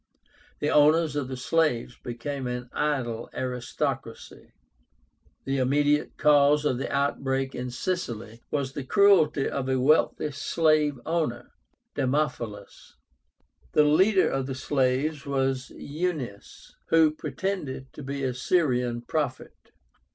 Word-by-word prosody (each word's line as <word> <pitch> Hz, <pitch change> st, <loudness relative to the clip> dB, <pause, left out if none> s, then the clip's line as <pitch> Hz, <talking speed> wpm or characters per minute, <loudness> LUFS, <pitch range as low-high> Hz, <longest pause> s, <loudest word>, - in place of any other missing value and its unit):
The 150 Hz, -, -1 dB
owners 155 Hz, +1 st, +4 dB
of 145 Hz, -3 st, -1 dB
the 130 Hz, 0 st, -5 dB
slaves 125 Hz, -3 st, 0 dB
became 130 Hz, +2 st, -5 dB
an 125 Hz, 0 st, -5 dB
idle 125 Hz, -6 st, -1 dB
aristocracy. 125 Hz, -1 st, -4 dB, 0.9 s
The 135 Hz, 0 st, -1 dB
immediate 145 Hz, +3 st, +1 dB
cause 145 Hz, 0 st, +4 dB
of 130 Hz, -4 st, +1 dB
the -, -, -3 dB
outbreak 135 Hz, -1 st, -1 dB
in 125 Hz, 0 st, -4 dB
Sicily 120 Hz, -7 st, -4 dB
was 140 Hz, -3 st, -2 dB
the 140 Hz, -, -4 dB
cruelty 160 Hz, -3 st, +4 dB
of 135 Hz, -1 st, -3 dB
a 130 Hz, -1 st, +1 dB
wealthy 150 Hz, +2 st, +2 dB
slave 150 Hz, -1 st, +1 dB
owner, 155 Hz, -8 st, -2 dB, 0.4 s
Damophilus. 125 Hz, -7 st, -3 dB, 0.8 s
The 150 Hz, -, +5 dB
leader 185 Hz, +7 st, +4 dB
of 135 Hz, -1 st, -2 dB
the 135 Hz, -, -4 dB
slaves 140 Hz, +2 st, 0 dB
was 135 Hz, -2 st, -1 dB
EUNUS, 145 Hz, -, -5 dB
who 160 Hz, -2 st, +5 dB
pretended 150 Hz, -3 st, -4 dB
to -, -, -9 dB
be 140 Hz, 0 st, -4 dB
a 130 Hz, -1 st, 0 dB
Syrian 125 Hz, -4 st, 0 dB
prophet. 145 Hz, -2 st, -3 dB
140 Hz, 120 wpm, -26 LUFS, 125-150 Hz, 0.9 s, The